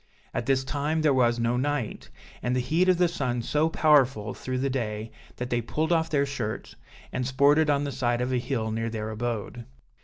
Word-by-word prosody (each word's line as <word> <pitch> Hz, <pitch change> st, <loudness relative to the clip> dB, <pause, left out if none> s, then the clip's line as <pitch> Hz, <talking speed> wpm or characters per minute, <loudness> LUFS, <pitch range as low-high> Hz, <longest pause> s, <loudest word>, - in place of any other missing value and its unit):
At -, -, -3 dB
this 135 Hz, -1 st, +2 dB
time 150 Hz, +3 st, -1 dB
there 150 Hz, -3 st, +4 dB
was 120 Hz, -2 st, +3 dB
no 120 Hz, +1 st, +1 dB
night, 140 Hz, -3 st, -2 dB, 0.3 s
and 125 Hz, +1 st, 0 dB
the -, -, +2 dB
heat 160 Hz, +9 st, +2 dB
of 180 Hz, -, +4 dB
the 180 Hz, 0 st, +4 dB
sun 125 Hz, -8 st, -2 dB
so 150 Hz, +6 st, +1 dB
powerful 135 Hz, -10 st, +3 dB
through 130 Hz, 0 st, -4 dB
the 135 Hz, +2 st, 0 dB
day, 110 Hz, -3 st, -3 dB, 0.2 s
that 125 Hz, 0 st, -5 dB
they 120 Hz, 0 st, +1 dB
pulled 155 Hz, +8 st, -2 dB
off 160 Hz, -1 st, +2 dB
their 140 Hz, -2 st, +2 dB
shirts, 125 Hz, -6 st, -5 dB, 0.4 s
and 125 Hz, -1 st, -1 dB
sported 145 Hz, +4 st, +4 dB
on 145 Hz, 0 st, +2 dB
the 140 Hz, -, -2 dB
side 120 Hz, -3 st, 0 dB
of 125 Hz, +1 st, -1 dB
a 125 Hz, -, +2 dB
hill 120 Hz, -3 st, -2 dB
near 115 Hz, +1 st, -2 dB
their 110 Hz, -1 st, -4 dB
abode. 120 Hz, +1 st, -4 dB
130 Hz, 210 wpm, -27 LUFS, 120-145 Hz, 0.4 s, there